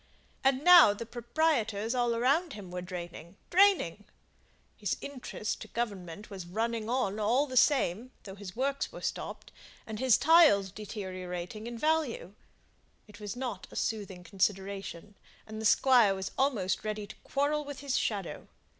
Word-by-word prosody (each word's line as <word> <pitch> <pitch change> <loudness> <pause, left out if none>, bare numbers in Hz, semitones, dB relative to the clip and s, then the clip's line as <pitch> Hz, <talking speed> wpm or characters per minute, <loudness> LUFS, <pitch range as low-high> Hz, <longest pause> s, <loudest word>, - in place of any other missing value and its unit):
And 270 +1 +2
now 345 -11 +9
the 230 - -6
proprietors 235 -3 0
all 240 -2 +1
around 280 +7 +1
him 195 -4 -9
were 180 0 -4
draining 175 -1 -8 0.2
draining; 350 - +3 0.7
his - - -2
interest 255 -6 -5
to - - -7
Government 205 -4 -5
was 190 -3 -7
running 225 +3 -2
on 225 -5 0
all 235 +7 +2
the 260 -3 -7
same, 245 - +3
though 195 - -9
his 195 -1 -9
works 275 +3 -1
were - - -10
stopped, - - -5 0.3
and 220 -1 -6
his 255 -2 +4
tiles 290 - +5
deteriorating 185 0 -6
in 235 0 -6
value. 300 - 0 0.7
It 210 0 -14
was 205 0 -6
not 245 -7 -5
a - - -13
soothing 200 -5 -3
consideration, 195 0 -3 0.3
and 220 0 -7
the - - -4
Squire 230 -3 +5
was 190 0 -5
almost 205 -9 0
ready 215 -1 -3
to - - -11
quarrel 290 +2 0
with 285 -1 -8
his 280 -2 -2
shadow. 200 -5 -2
220 Hz, 155 wpm, -30 LUFS, 195-260 Hz, 0.7 s, now